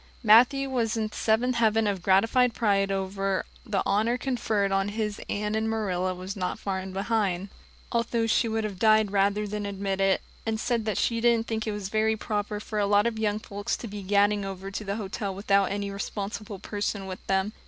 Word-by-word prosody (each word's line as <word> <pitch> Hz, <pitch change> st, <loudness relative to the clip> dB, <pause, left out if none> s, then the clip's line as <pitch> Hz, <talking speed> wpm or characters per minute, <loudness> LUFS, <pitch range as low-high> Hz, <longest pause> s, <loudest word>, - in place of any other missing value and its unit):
Matthew 245 Hz, +5 st, +6 dB
was 235 Hz, -4 st, 0 dB
in 215 Hz, -1 st, -1 dB
the -, -, -13 dB
seventh 235 Hz, +3 st, +1 dB
heaven 225 Hz, -1 st, +3 dB
of 200 Hz, -3 st, -1 dB
gratified 225 Hz, +6 st, +3 dB
pride 200 Hz, -3 st, +2 dB
over 195 Hz, 0 st, -1 dB, 0.2 s
the 200 Hz, -2 st, -1 dB
honor 220 Hz, +4 st, +2 dB
conferred 225 Hz, -6 st, 0 dB
on 195 Hz, +1 st, +1 dB
his 210 Hz, -1 st, -3 dB
Anne 210 Hz, +1 st, -1 dB
and 220 Hz, 0 st, 0 dB
Marilla 185 Hz, -4 st, -1 dB
was 185 Hz, +2 st, -6 dB
not 180 Hz, -2 st, -2 dB
far 190 Hz, -1 st, -3 dB
behind, 195 Hz, -1 st, -1 dB, 0.4 s
although 235 Hz, 0 st, 0 dB
she 225 Hz, +1 st, +2 dB
would 220 Hz, 0 st, -1 dB
have 200 Hz, -4 st, -4 dB
died 215 Hz, -1 st, +4 dB
rather 200 Hz, +1 st, +2 dB
than 210 Hz, 0 st, -4 dB
admit 195 Hz, -1 st, -2 dB
it, 195 Hz, 0 st, +2 dB, 0.2 s
and 220 Hz, -1 st, -2 dB
said 225 Hz, -2 st, 0 dB
she 230 Hz, -1 st, +1 dB
didn't 235 Hz, -1 st, +3 dB
think 220 Hz, -1 st, -3 dB
it -, -, 0 dB
was 205 Hz, -2 st, -4 dB
very 220 Hz, +1 st, +1 dB
proper 210 Hz, 0 st, -2 dB
for 215 Hz, 0 st, -4 dB
a 200 Hz, -, +2 dB
lot 205 Hz, +1 st, +4 dB
of 230 Hz, -2 st, -1 dB
young 210 Hz, -1 st, +1 dB
folks 205 Hz, -1 st, -4 dB
to 235 Hz, -, -7 dB
be 205 Hz, -1 st, -6 dB
gadding 205 Hz, +1 st, +2 dB
over 195 Hz, 0 st, -6 dB
to 205 Hz, -, -4 dB
the 200 Hz, 0 st, -3 dB
hotel 200 Hz, -2 st, -4 dB
without 200 Hz, 0 st, +3 dB
any 200 Hz, 0 st, -3 dB
responsible 200 Hz, +1 st, -5 dB
person 205 Hz, 0 st, -3 dB
with 185 Hz, -1 st, -7 dB
them. 195 Hz, +2 st, +1 dB
210 Hz, 200 wpm, -27 LUFS, 195-220 Hz, 0.4 s, Matthew